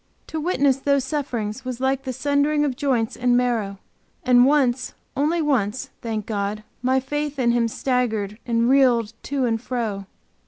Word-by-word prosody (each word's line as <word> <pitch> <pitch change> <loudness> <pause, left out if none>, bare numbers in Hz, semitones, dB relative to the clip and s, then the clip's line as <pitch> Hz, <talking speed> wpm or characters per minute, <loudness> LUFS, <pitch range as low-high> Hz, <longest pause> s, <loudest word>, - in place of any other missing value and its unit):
To 320 - -4
witness 285 -5 +2
these 280 0 +1
sufferings 260 -5 -3
was 255 -2 -5
like 265 +1 0
the 260 - -2
sundering 290 +3 +1
of 270 -3 -1
joints 245 -5 0
and 245 0 +2
marrow, 225 -5 0 0.5
and 250 0 +6
once, 260 -4 +1 0.2
only 310 +4 +1
once, 260 -2 0
thank 220 -3 -3
God! 210 0 -3 0.2
my 260 +1 +2
faith 295 +2 -3
in 240 -3 +2
Him 235 -1 +2
staggered 225 -4 -1
and 235 -1 +1
reeled 245 -4 +3
to 275 -2 0
and 225 -2 0
fro. 220 -6 -3
250 Hz, 160 wpm, -23 LUFS, 230-275 Hz, 0.5 s, and